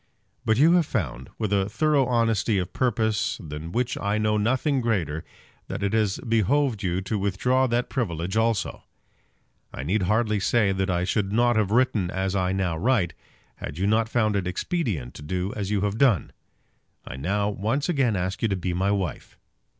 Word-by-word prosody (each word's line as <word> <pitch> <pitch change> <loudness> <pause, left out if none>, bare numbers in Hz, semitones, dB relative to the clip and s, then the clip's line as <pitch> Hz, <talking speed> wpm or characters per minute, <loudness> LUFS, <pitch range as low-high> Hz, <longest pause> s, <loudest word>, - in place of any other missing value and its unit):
But 110 0 +3
you 155 +6 +6
have 175 -3 +4
found, 65 - -3
with 105 -2 -1
a 100 0 +1
thorough 145 +2 +2
honesty 115 -3 +1
of 90 -1 -3
purpose 110 -4 0
than 80 -3 -7
which 125 +4 -1
I 100 +1 0
know 105 0 +1
nothing 130 +6 +1
greater, 90 -9 -1 0.4
that - - -4
it 100 +1 0
has 110 -3 +1
behoved 115 +1 +2
you 90 -1 -1
to 100 +3 -2
withdraw 125 +7 +1
that 120 +1 0
privilege 90 - -2
also. 110 -2 0 0.9
I 65 - -6
need 95 +9 0
hardly 105 +2 +1
say 100 +1 +2
that 95 0 -1
I 90 -1 +1
should 95 +1 0
not 120 +2 +3
have 110 -3 +2
written 110 -5 +2
as 95 +1 -2
I 95 -1 +1
now 95 -4 -1
write, 105 -6 +1 0.4
had 75 - -7
you 95 - 0
not 110 +2 +2
found 110 -3 +1
it 95 -3 -1
expedient 95 - -2
to - - -11
do 90 +6 -3
as 100 -2 -3
you 105 -2 0
have 105 +2 -1
done. 120 - +3 0.7
I - - -7
now 100 +9 0
once 110 +8 -1
again 135 - +1
ask 95 +1 -2
you 115 - +2
to 100 - 0
be 90 -1 -2
my 95 +3 0
wife. 95 -6 -3
105 Hz, 190 wpm, -25 LUFS, 95-115 Hz, 0.9 s, you